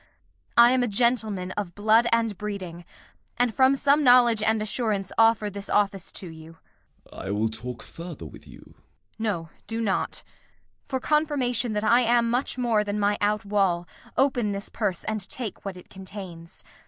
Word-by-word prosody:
I 235 +1 +8
am 255 0 +2
a 245 - +1
gentleman 215 -4 +1
of 185 -3 -5
blood 220 +3 +4
and 230 -2 +1
breeding, 185 -4 -6 0.5
And 245 -1 +2
from 265 +3 +4
some 285 +2 +3
knowledge 245 -4 +6
and 220 0 +2
assurance 215 -3 -2
offer 225 -1 +4
This 200 0 -6
office 200 -3 0
to 185 - -7
you. 160 0 -11 0.6
Gent. - - -8
I - - -4
will 105 +2 0
talk 120 +2 -1
further 170 +1 -9
with - - -13
you. - - -13
Kent. - - -21 0.4
No, 190 -7 -2 0.2
do 225 0 -3
not. 210 -4 -1 0.6
For 265 -2 -2
confirmation 265 -6 0
that 210 0 -1
I 235 +3 +5
am 235 -1 +2
much 250 +2 -1
more 235 -4 +2
Than 205 0 -3
my 205 0 +2
out 210 +1 +1
wall, 190 -4 +1 0.3
open 250 -6 +2
this 200 +1 -6
purse 200 -6 -2
and 215 -3 -3
take 240 -5 -6
What 195 -2 -6
it 180 - -13
contains. 190 -3 -10
210 Hz, 175 wpm, -25 LUFS, 190-240 Hz, 0.6 s, I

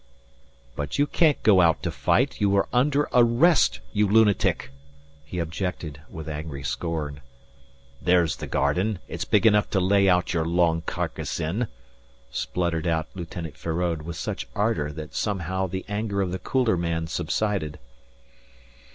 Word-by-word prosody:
"But 75 +1 -3
you 145 - +4
can't 150 0 +2
go 100 -4 +6
out 85 -2 +3
to - - -1
fight; - - +1
you 100 -1 +3
are 100 - +2
under 140 +4 +2
arrest, 120 - +4
you 105 0 +3
lunatic," 105 -6 +3 0.5
he 80 +4 -7
objected, 80 -3 -4
with 80 -1 -8
angry 75 -2 -5
scorn. 70 +1 -3 0.8
"There's 85 -4 +3
the - - -6
garden. 90 +10 +1
It's 85 +1 -4
big 105 +1 +2
enough 105 -2 +4
to 95 - +1
lay 100 +1 +4
out 90 0 +2
your 80 -2 +1
long 85 0 +2
carcass - - -3
in," 100 +10 -1 0.6
spluttered 85 -2 -1
out 80 -2 0
Lieutenant 85 -3 -7
Feraud 85 -1 -2
with 85 +2 -6
such 80 - -4
ardour 100 -9 0
that 75 +1 -8
somehow 95 -2 -1
the 95 +1 -5
anger 105 -1 -2
of 90 - -3
the 95 - -3
cooler 120 -1 +1
man 85 -1 -1
subsided. 80 0 -2
90 Hz, 150 wpm, -25 LUFS, 80-105 Hz, 0.8 s, go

